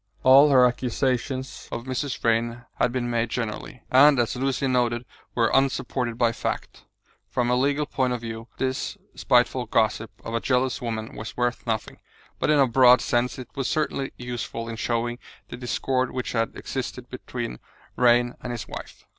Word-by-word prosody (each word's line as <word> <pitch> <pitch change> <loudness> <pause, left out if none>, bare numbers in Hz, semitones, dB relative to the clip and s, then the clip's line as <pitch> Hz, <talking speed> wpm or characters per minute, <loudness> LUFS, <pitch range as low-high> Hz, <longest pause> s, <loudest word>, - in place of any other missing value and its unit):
All 135 +3 +8
her 130 -3 +6
accusations 130 +1 -1
of 120 - -4
Mrs. 130 +1 -3
Vrain 115 +1 0
had 125 - +3
been 125 -1 -2
made 115 -1 0
generally, 115 +1 -4
and, 140 +2 +7
as 120 0 +1
Lucian 135 +1 0
noted, 120 -1 +1 0.3
were 115 -2 +2
unsupported 130 -3 +1
by 120 -1 +3
fact. - - -5 0.4
From 120 0 0
a - - +4
legal 140 +3 +1
point 130 -3 0
of 125 -2 -2
view 115 0 -6
this 130 0 -2 0.2
spiteful - - +2
gossip - - +1 0.2
of 115 - -5
a 115 - +1
jealous 130 +2 0
woman 110 -2 -4
was 110 +1 -7
worth 120 0 -1
nothing, 110 -2 -2 0.4
but - - 0
in 150 - +5
a 140 - +6
broad 125 0 +6
sense 120 +1 0
it 125 -2 -8
was 135 -3 -2
certainly 150 -3 -1
useful 120 -2 -5
in 115 - -5
showing 120 +1 -1 0.3
the - - -6
discord 130 +1 -1
which 125 -1 -4
had 115 -1 -1
existed - - -5
between - - -6 0.4
Vrain 120 0 +4
and 125 - -5
his 115 -4 -5
wife. - - -9
125 Hz, 170 wpm, -25 LUFS, 115-130 Hz, 0.4 s, All